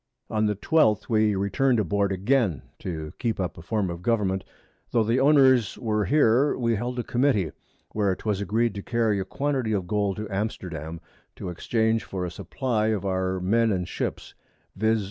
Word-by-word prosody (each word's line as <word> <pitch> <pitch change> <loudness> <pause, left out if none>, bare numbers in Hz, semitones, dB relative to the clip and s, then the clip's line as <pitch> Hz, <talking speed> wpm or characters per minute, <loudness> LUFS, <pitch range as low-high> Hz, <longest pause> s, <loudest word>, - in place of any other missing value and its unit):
On 110 -1 +2
the 105 - 0
12th, 110 - +2
we 110 -2 +3
return'd 115 +6 +1
aboard 100 0 +1
again; 100 +2 +2
and - - -30
to 80 -4 -5
keep 115 -4 -1
up 90 -3 -2
a - - -10
Form 95 +1 -1
of 85 0 -7
Government, 95 -3 0 0.5
tho' 115 - +2
the 115 +4 +1
Owners 130 -5 +4
were 105 -3 0
here, 140 -1 +3
we 115 -2 +1
held 120 +3 -3
a 120 - -1
Committee, 120 - +1 0.4
where 100 -3 +1
'twas 105 -1 -2
agreed 110 +2 +1
to 100 - -5
carry 115 -2 0
a 95 - -2
Quantity 135 0 -1
of 95 -3 -1
Gold 100 0 0
to 105 0 -4
Amsterdam, 85 -6 -4 0.3
to - - -6
exchange 110 +5 0
for 95 -2 -4
a 90 - -5
Supply 110 +4 -1
of 105 -3 -1
our 95 -1 0
Men 110 +5 +2
and 90 -3 -1
Ships, - - -4 0.4
_viz. 110 +2 +2
105 Hz, 185 wpm, -25 LUFS, 95-115 Hz, 0.5 s, Owners